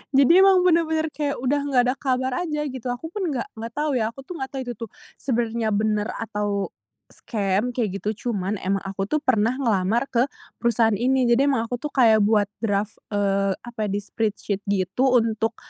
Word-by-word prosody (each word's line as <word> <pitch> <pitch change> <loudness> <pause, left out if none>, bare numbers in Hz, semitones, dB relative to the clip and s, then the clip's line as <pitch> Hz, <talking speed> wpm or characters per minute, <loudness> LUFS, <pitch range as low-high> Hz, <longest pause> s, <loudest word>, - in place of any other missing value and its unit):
Jadi 280 +7 +6
emang 380 -1 +6
bener-bener 320 -3 +2
kayak 290 -2 -2
udah 265 +3 0
enggak 260 -3 +4
ada 255 - +1
kabar 260 -1 0 0.2
aja, 300 -1 -2
gitu. 255 -1 -6
Aku 245 +7 -4
pun 385 -1 -2
enggak 265 -7 -2
enggak 230 +1 -6
tahu, 300 0 0
ya, 220 - +1
aku 270 +3 -12 0.4
itu 245 - -5
tuh 230 - -6 0.3
sebenarnya 235 -3 -1
bener 210 0 +1
atau 205 -3 -2 0.4
scam, 205 +1 -1
kaya 235 -4 +1
gitu, 200 +2 -2 0.2
cuman 200 -3 -1
emang 195 +1 -1
aku 195 0 -3
tuh 305 - +1
pernah 230 -2 +2
ngelamar 230 -1 +1
ke 245 +2 +2 0.3
perusahaan 230 -1 +3
ini, 260 +4 +2
jadi 240 +4 +4
emang 265 -5 +2
aku 245 +1 -4
tuh 300 - -3
kayak 230 -5 +5
buat 210 -1 +3
draft, 205 -1 -1
eee, 195 -1 +1
apa 240 -1 -11
ya, - - -4
di - - 0
Spreadsheet, 205 -1 -2
gitu, 200 +6 +1
untuk, 225 -1 +1
230 Hz, 185 wpm, -23 LUFS, 210-265 Hz, 0.4 s, Jadi